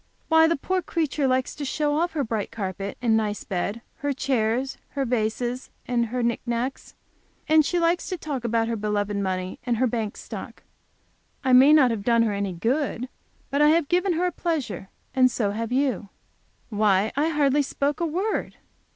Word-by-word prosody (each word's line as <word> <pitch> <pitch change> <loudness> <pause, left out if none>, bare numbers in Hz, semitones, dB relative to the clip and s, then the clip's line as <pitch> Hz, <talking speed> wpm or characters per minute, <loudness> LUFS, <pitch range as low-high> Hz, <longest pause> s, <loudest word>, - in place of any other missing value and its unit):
"Why 320 0 +6
the 335 - +2
poor 370 +6 -1
creature 305 -5 -1
likes 255 0 +1
to 295 - -6
show 295 +1 0
off 340 +2 0
her 295 -3 0
bright 220 -3 -2
carpet 195 -1 -4
and 225 -2 +4
nice 210 -2 -1
bed, 200 +3 -3 0.2
her 285 0 -1
chairs, 260 -1 0
her 275 -1 -1
vases 240 +1 -1 0.2
and 235 -2 +1
her 245 +2 -2
knick 235 0 0
knacks, 240 +2 -3 0.5
and 310 0 +6
she 355 - -1
likes 340 +1 +1
to 365 - -2
talk 290 -6 -4
about 230 -1 +1
her 230 - -1
beloved 205 -1 -1
money, 185 -2 -2
and 240 -2 0
her 255 - +3
bank 225 -3 -2
stock. - - -8 0.8
I 260 -1 +2
may 265 +4 +8
not 285 -5 +6
have 215 -3 -3
done 230 0 +4
her 215 -2 0
any 200 -2 -2
good; 250 - -1 0.4
but 280 +1 +1
I 295 - +7
have 320 -2 +3
given 360 +1 +2
her 340 +2 0
a 360 - +1
pleasure, 290 - -3 0.2
and 255 -1 +5
so 215 -4 -1
have 225 +2 -3
you." 255 -6 0 0.6
"Why, 205 -2 +2
I 295 +3 +2
hardly 295 -2 +2
spoke 280 +1 -1
a 340 - +1
word." 375 +7 -2
250 Hz, 190 wpm, -25 LUFS, 220-295 Hz, 0.8 s, may